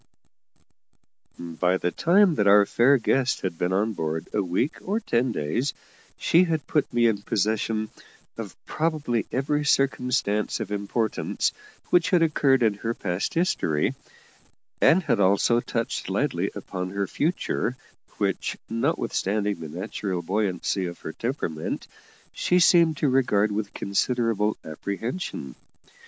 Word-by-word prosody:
A - - -11
MIRAGE. 85 -2 -8
By 90 +1 +3
the 90 - -1
time 180 - +4
that 105 -9 +1
our 100 0 +7
fair 130 +7 +4
guest 130 +2 +1
had 90 -3 -4
been 90 - 0
on 105 +4 +1
board 80 -3 -3
a 105 - +2
week 95 - -1
or 205 +4 -1
ten 125 - 0
days, 115 - -2 0.4
she 175 +3 +4
had 160 -3 -1
put 150 - 0
me 120 0 +2
in 110 -3 +2
possession 110 +2 -1 0.4
of - - -7
probably 155 -8 -1
every 145 +3 0
circumstance 125 -7 +1
of 105 -3 -5
importance 105 +2 -1 0.4
which 175 -2 +4
had 180 -3 +4
occurred 140 -5 +3
in 110 -2 +3
her 115 +1 -2
past 90 - -3
history, 125 - +1 0.9
and 185 +3 +5
had 115 - +1
also 100 +5 +3
touched 115 -1 -3
lightly - - 0
upon 90 0 -5
her 100 +1 -2
future, 135 - -1 0.4
which, - - -1
notwithstanding 105 -2 -1
the 80 - -7
natural 90 +1 -4
buoyancy 95 0 -1
of 85 - -9
her 80 - -6
temperament, 115 - -3 0.5
she 180 - +2
seemed 170 -3 +5
to 150 - +1
regard 115 -6 +2
with 105 0 -3
considerable 110 0 0
apprehension. 100 - -5
110 Hz, 140 wpm, -25 LUFS, 95-135 Hz, 0.9 s, our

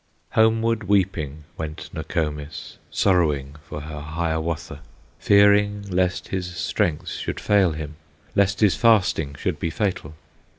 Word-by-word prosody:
Homeward 110 0 +2
weeping 85 -7 0
went 80 -1 -6
Nokomis, 75 -2 -4
Sorrowing 75 -7 +1
for 75 - -5
her 75 0 -7
Hiawatha, 80 +1 -3 0.4
Fearing 100 0 +4
lest 90 0 0
his 90 -2 -3
strength 80 -3 -1
should - - -4
fail 100 -5 +3
him, 75 -1 -7 0.4
Lest 100 +1 +2
his 105 -3 +5
fasting 100 - +3
should - - -2
be 85 - -1
fatal. 80 -4 -2
85 Hz, 120 wpm, -23 LUFS, 75-100 Hz, 0.4 s, his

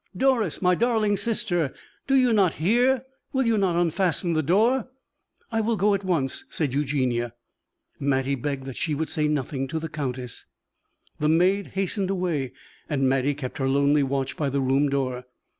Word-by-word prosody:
Doris, 230 - +1
my 180 0 +4
darling 220 0 +2
sister, 180 - 0 0.3
do 270 - +3
you 255 -3 +4
not 195 -6 +3
hear? 245 +8 +2 0.3
Will 265 -1 +1
you 230 -1 +3
not 185 -4 +1
unfasten 175 0 +1
the 155 - +2
door!" 220 - +2 0.6
"I 225 -1 +1
will 225 0 0
go 205 +2 +3
at 200 0 -1
once," 160 -8 -1
said 145 -6 -2
Eugenie. 130 -4 0 0.7
Mattie 135 -1 +1
begged 135 0 -3
that 135 -2 -7
she 155 -2 -1
would 160 +2 -2
say 155 -2 +1
nothing 135 -2 -2
to 160 - -3
the 160 0 -4
countess. 130 -5 -5 0.7
The 150 - +1
maid 185 +5 +3
hastened 195 0 -1
away 170 -9 -1 0.4
and 135 -3 +1
Mattie 135 +2 +1
kept 135 -2 -6
her 135 -1 +1
lonely 140 +2 +3
watch 135 -1 -1
by 145 -3 -1
the 140 +1 -1
room 135 +2 +2
door. 130 -2 -2
155 Hz, 175 wpm, -25 LUFS, 135-200 Hz, 0.7 s, my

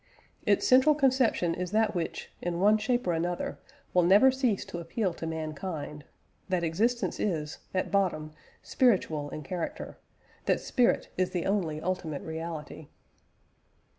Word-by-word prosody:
Its - - +3
central 260 +4 +6
conception 255 - +2
is 180 +1 -3
that 215 +1 +2
which, 175 -3 -4
in 175 -1 -2
one 205 +3 +5
shape 240 +3 0
or 175 - +1
another, 175 +2 -2 0.3
will 180 - +5
never 200 +9 +6
cease 255 -6 0
to 170 - -6
appeal 180 +3 -2
to 165 - -6
mankind 155 -1 -5 0.4
that 180 -2 0
existence 225 +9 0
is, 155 -7 -2
at 185 - -1
bottom, 175 -6 0 0.3
spiritual 165 - +1
in 155 - -6
character 170 +3 -5 0.5
that - - +2
spirit 245 -2 +1
is 185 - +2
the 175 -2 -2
only 175 -7 0
ultimate 165 -4 -3
reality. 160 -2 -6
180 Hz, 140 wpm, -29 LUFS, 160-215 Hz, 0.5 s, central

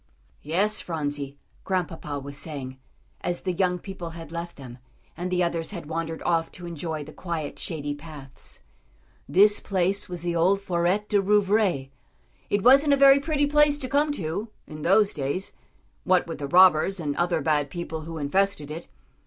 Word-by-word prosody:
"Yes, 195 +8 0
Phronsie," 145 -4 -4 0.3
Grandpapa 175 -6 -2
was 140 +1 -8
saying, 135 -4 -5 0.4
as 175 0 -2
the 185 - -1
young 180 0 +1
people 180 -2 -7
had 165 -2 -9
left 170 +1 -5
them, 125 -3 -11 0.4
and 180 +2 -4
the 180 0 +1
others 170 -1 -2
had 175 -6 -7
wandered 165 +1 -4
off 165 -1 +1
to 175 - -8
enjoy 160 -2 -4
the 155 +2 -11
quiet, 165 -5 -5
shady 145 -3 -3
paths, 145 -3 -10 0.7
"this 205 +3 +5
place 190 0 0
was 175 -2 -5
the 175 -1 -1
old 185 +4 +3
Fôret 185 +2 0
de 205 -1 +2
Rouvray. 195 -8 +2 0.6
It 205 -1 +1
wasn't 275 +3 +6
a - - +4
very 275 0 +7
pretty 290 0 +1
place 295 0 +4
to 265 - -4
come 290 +3 +2
to 190 - -3 0.2
in 155 0 -9
those 195 +5 +4
days, 145 +6 -3 0.5
what 185 -1 +3
with 165 -3 -6
the 140 - -3
robbers 185 +2 +5
and 145 -3 -2
other 175 -1 +1
bad 150 -2 +1
people 165 0 -5
who 165 +1 -7
infested 155 0 0
it. 160 +2 -7
170 Hz, 170 wpm, -25 LUFS, 155-195 Hz, 0.7 s, very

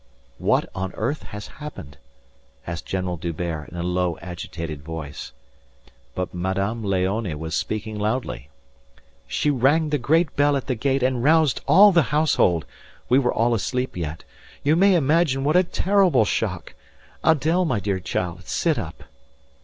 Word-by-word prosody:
"What - - +2
on 95 0 -4
earth 130 +8 -2
has 105 +1 -8 0.2
happened?" 70 - -9 0.7
asked 85 -1 -6
General 90 -2 -2
D'Hubert 85 -2 -4
in 85 - -9
a 85 - -3
low, 90 -1 0
agitated 85 -4 -6
voice. 75 -2 -7 0.8
But 90 0 -3
Madame 95 +5 -2
Léonie 95 -2 -1
was 80 0 -5
speaking 110 +3 -3
loudly. 105 - -2 0.8
"She 150 - +1
rang 145 +4 +2
the 150 -1 0
great 160 +6 +2
bell 145 0 +3
at 135 - -5
the 130 - -1
gate 135 +2 0
and 130 -2 +1
roused 155 -1 +3
all 205 +2 +8
the 175 -2 +5
household 150 - +2 0.4
we 130 - +5
were 125 -3 +1
all 120 +1 +2
asleep 125 +4 -2
yet. 80 -3 -5 0.4
You 150 +3 +3
may 195 +2 +5
imagine 150 -3 +2
what 150 +4 +1
a 180 - +7
terrible 180 - +3
shock.... - - -2 0.5
Adèle, 160 +4 +3
my 125 -8 0
dear 100 -1 -1
child, 90 -1 -4
sit - - 0
up." - - -7
110 Hz, 155 wpm, -23 LUFS, 90-145 Hz, 0.8 s, all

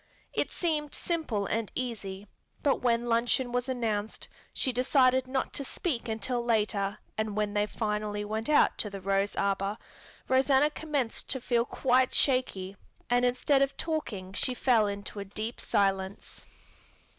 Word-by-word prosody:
It - - 0
seemed 305 -4 -1
simple 305 - -1
and 225 +1 -2
easy, 205 -5 -4 0.4
but 280 - +3
when 235 -1 +2
luncheon 240 +2 +1
was 245 +1 -1
announced, 220 -4 -2 0.2
she 260 - -1
decided 255 0 +3
not 260 0 -2
to 280 - 0
speak 255 -4 -2
until 235 +3 -1
later 210 -3 +1 0.2
and 215 -1 -1
when 210 -1 0
finally 210 -1 -2
they - - -4
went 220 +4 -3
out 300 - +4
to 210 - -1
the 200 -1 -7
rose 195 +1 0
arbor, 195 +1 0 0.5
Rosanna 270 +2 +4
commenced 290 -6 -2
to 265 - -1
feel 240 -1 +1
quite 255 0 +2
shaky 200 -8 +1 0.4
and 245 0 +4
instead 270 +3 +2
of 275 0 +1
talking 215 - -3
she 250 +6 0
fell 235 -5 +3
into 200 +1 -5
a - - -3
deep 215 +4 -5
silence. 195 -1 -1
235 Hz, 150 wpm, -29 LUFS, 205-260 Hz, 0.5 s, out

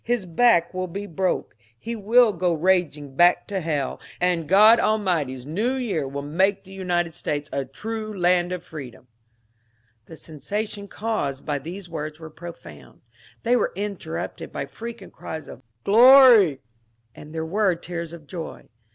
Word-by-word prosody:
His 240 -4 -1
back 175 -1 +3
will 185 0 -3
be 200 +4 -6
broke. 185 0 -2 0.2
He 230 - -5
will 225 +1 +4
go 175 -1 0
raging 155 -5 0
back 175 +4 +4
to 200 -2 -1
hell, 150 -5 -2 0.2
and 175 -4 0
God 215 +4 +7
Almighty's 170 - 0
New 210 - -1
Year 205 - -2
will 140 +1 -5
make 190 +7 +1
the 190 - -15
United 175 -3 -1
States 145 -1 -3
a 140 -1 -1
true 215 - -6
land 180 -2 +2
of 180 -1 -4
freedom." 140 -8 -10 1.0
The 160 - -11
sensation 200 +7 -5
caused 200 -12 -3
by 145 -2 -1
these 175 +6 -8
words 155 -2 -6
was 160 -1 -10
profound. 85 - -12 0.4
They 240 +2 +3
were 245 - 0
interrupted 195 - -5
by - - -4
frequent 225 +6 -9
cries 160 -2 -7
of - - -11 0.2
Glory 240 - +8
I 135 - -18 0.3
" 115 0 -44
and 150 - -12
there 160 0 -3
were 190 +2 +1
tears 170 -1 -6
of 170 -3 -11
joy. 165 +1 -8
175 Hz, 160 wpm, -24 LUFS, 155-205 Hz, 1.0 s, Glory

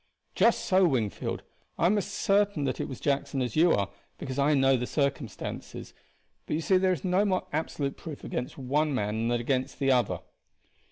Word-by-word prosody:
"Just 230 - +3
so, 185 -1 +4
Wingfield. 115 -9 -2 0.3
I - - +2
am 190 +5 +4
as 205 - -1
certain 200 -5 +2
that 130 -2 -1
it - - -2
was 130 - -7
Jackson 140 -1 -1
as 125 -3 -2
you 165 +2 +5
are, 100 -2 0 0.3
because 130 +1 -5
I 145 +2 +4
know 135 -1 +4
the 125 -1 -2
circumstances; 140 -4 -3 0.5
but - - -1
you 160 - -1
see 185 +3 +3
there 185 0 +3
is 175 -7 -2
no 185 +2 +2
more 190 -3 0
absolute 145 -2 -2
proof 155 -4 -8
against 125 - -4
one 145 +2 0
man 110 0 -1
than 120 0 +1
against 130 +2 -1
the 135 -1 +2
other. 105 -9 +1
140 Hz, 190 wpm, -28 LUFS, 125-170 Hz, 0.5 s, you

